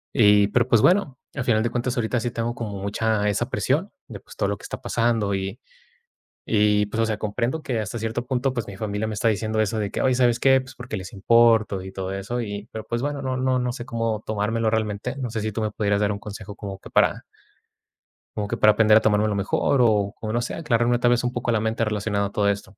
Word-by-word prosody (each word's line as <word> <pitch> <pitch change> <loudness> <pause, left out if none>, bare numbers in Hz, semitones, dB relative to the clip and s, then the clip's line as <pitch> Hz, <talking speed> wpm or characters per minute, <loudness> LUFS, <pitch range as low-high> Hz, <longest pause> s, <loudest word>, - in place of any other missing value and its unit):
Y 105 -4 +6
pero 120 +3 +2
pues 115 -3 +4
bueno, 175 -8 +3 0.2
al 135 - -2
final 110 -3 +2
de 120 - 0
cuentas, 120 +2 -2
ahorita 120 +1 0
sí 120 +1 -2
tengo 115 +1 -3
como 105 -4 -5
mucha 105 +1 0
esa 100 - -1
presión - - 0 0.2
de - - -8
pues - - -15
todo - - 0
lo - - -2
que - - -18
está - - -7
pasando 115 -4 0
y 95 0 -4 0.9
y 105 -1 +3
pues, 110 +2 -3
o 115 - +3
sea, 110 -1 -2
comprendo 120 +8 -2
que 120 -4 -2
hasta 110 +2 -4
cierto 115 +2 -3
punto, 130 +1 0
pues 120 -4 -3
mi 100 - -8
familia 105 +1 -3
me 110 - -3
está 115 +3 +1
diciendo 110 +1 0
eso 110 +1 0
de 105 -2 -2
que - - -2
oye, 130 -1 +2
¿sabes 120 -2 +2
qué? 135 -1 +5
Pues 130 0 -11
porque 120 -3 -6
les 95 -1 -7
importo 110 -1 +3
y 95 0 -8
todo 95 0 -4
eso, 100 +5 -3
y 105 0 -5
pero 110 -1 -6
pues 120 0 -3
bueno, 145 +1 -3
no 130 -1 -2
no 130 0 +1
no 125 0 -1
sé 120 -1 -7
cómo 115 -3 -2
tomármelo 110 +2 0
realmente. 110 +2 -1
No 125 -4 -3
sé 110 -1 -3
si 110 0 -3
tú 110 - -3
me 110 - -1
pudieras 105 -1 0
dar 105 -1 +2
un 100 - -4
consejo 105 0 -9
como 100 -2 -7
que - - -12
para - - +2 1.2
como 105 - -1
que - - -2
para 105 0 +5
aprender 110 -1 +5
a 110 - +6
tomarme 105 0 +2
lo 105 - 0
mejor, 100 +6 +1
o 105 -3 +2
como, 110 -2 -4
no 120 - 0
sé, - - -4
aclararme 120 -5 +1
tal 120 - +3
vez 120 0 +2
un 125 0 -1
poco 120 0 -3
la 115 -2 +2
mente 110 +1 -1
relacionada 105 -1 -1
a - - -11
todo 105 -1 +1
esto. 100 0 -4
110 Hz, 255 wpm, -24 LUFS, 105-120 Hz, 1.2 s, Y